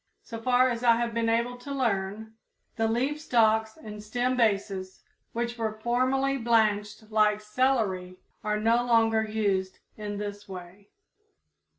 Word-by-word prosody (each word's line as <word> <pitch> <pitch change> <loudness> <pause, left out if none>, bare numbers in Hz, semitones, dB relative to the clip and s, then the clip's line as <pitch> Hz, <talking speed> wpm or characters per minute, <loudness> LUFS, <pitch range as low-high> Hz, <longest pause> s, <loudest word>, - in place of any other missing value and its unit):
So 230 -1 -8
far 255 +1 +3
as 235 0 -4
I 235 -1 +6
have 235 0 -1
been 230 0 0
able 235 +2 0
to 245 +3 -9
learn, 220 -4 -2 0.4
the 225 0 +1
leaf 265 +7 -1
stalks 220 -5 +2
and 210 -1 -9
stem 245 +4 -1
bases, 200 -5 -1 0.3
which 235 0 -3
were 215 -1 -2
formerly 260 +4 +1
blanched 215 -2 +1
like 210 -1 +3
celery, 210 -5 0 0.3
are 210 0 0
no 230 +2 +3
longer 225 -2 +3
used 200 -4 -1 0.2
in 205 -1 -5
this 205 0 -6
way. 185 +2 -10
220 Hz, 145 wpm, -27 LUFS, 210-240 Hz, 0.4 s, I